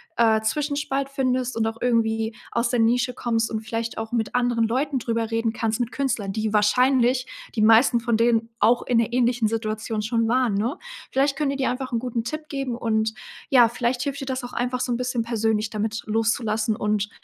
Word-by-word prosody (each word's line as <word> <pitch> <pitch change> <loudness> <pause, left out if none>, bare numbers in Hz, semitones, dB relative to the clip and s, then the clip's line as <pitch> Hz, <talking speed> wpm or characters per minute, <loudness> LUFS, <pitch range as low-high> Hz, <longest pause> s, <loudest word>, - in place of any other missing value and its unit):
äh, 220 -2 +3
Zwischenspalt 280 +2 -1
findest 255 -2 -1
und 225 -1 0
auch 225 - -4
irgendwie 225 -2 0 0.2
aus 235 0 0
der 245 -1 0
Nische 245 +2 +2
kommst 230 -2 -1
und 220 -1 -2
vielleicht 225 +1 -4
auch 225 0 -5
mit 225 -3 -1
anderen 240 -2 +1
Leuten 270 +4 0
drüber 230 -1 -2
reden 225 0 0
kannst, 225 0 -1
mit 240 -1 -1
Künstlern, 230 -8 -1
die 215 0 -2
wahrscheinlich 250 +4 +3 0.3
die 215 - 0
meisten 235 +2 +5
von 235 -1 0
denen 230 -1 +2
auch 240 +2 +4
in 240 - +1
'ner 230 0 0
ähnlichen 245 -2 +2
Situation 220 -1 -2
schon 230 +1 0
waren, 250 -2 +2
ne? 235 - -1 0.3
Vielleicht 275 +1 +2
können 295 -2 0
die - - -3
dir 265 - 0
einfach 255 +1 -4
'n 230 - +1
guten 240 -2 -3
Tipp 310 +5 -5
geben, 270 -4 -3
und 220 -2 0 0.4
ja, 245 -3 +6
vielleicht 245 +1 -1
hilft 280 +2 -3
dir - - -4
das 260 -1 -3
auch 245 - -9
einfach 250 +1 -1
so 250 0 -1
'n 235 - -1
bisschen 250 -1 -1
persönlich 220 -2 0
damit 220 +1 -3
loszulassen, 220 0 0
und, 210 -1 0
235 Hz, 205 wpm, -24 LUFS, 225-250 Hz, 0.4 s, ja